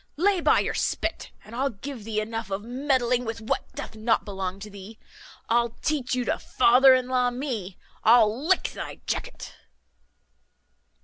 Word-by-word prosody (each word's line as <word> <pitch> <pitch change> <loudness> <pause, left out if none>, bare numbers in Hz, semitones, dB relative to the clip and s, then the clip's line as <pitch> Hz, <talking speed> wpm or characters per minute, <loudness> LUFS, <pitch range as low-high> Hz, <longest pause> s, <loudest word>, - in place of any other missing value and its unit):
Lay 375 +2 +2
by - - +4
your - - -2
spit, - - -2 0.2
and 220 - -10
I'll 270 +3 +1
give 235 +1 -8
thee 220 -1 -1
enough 225 0 -4
of 195 +1 -3
meddling 250 0 0
with 225 -1 -4
what 225 - -3
doth - - -7
not 220 +1 +1
belong 190 -2 -4
to 210 - -7
thee. 200 +2 -11 0.5
I'll 235 0 +1
teach 275 -5 0
you 250 -1 -1
to - - -1
father 255 +2 +5
in 255 -1 -1
law 250 -1 +2
me. 245 -8 -4 0.3
I'll 230 +4 +4
lick 375 0 +2
thy - - -7
jacket." - - -4
235 Hz, 165 wpm, -26 LUFS, 215-255 Hz, 0.5 s, father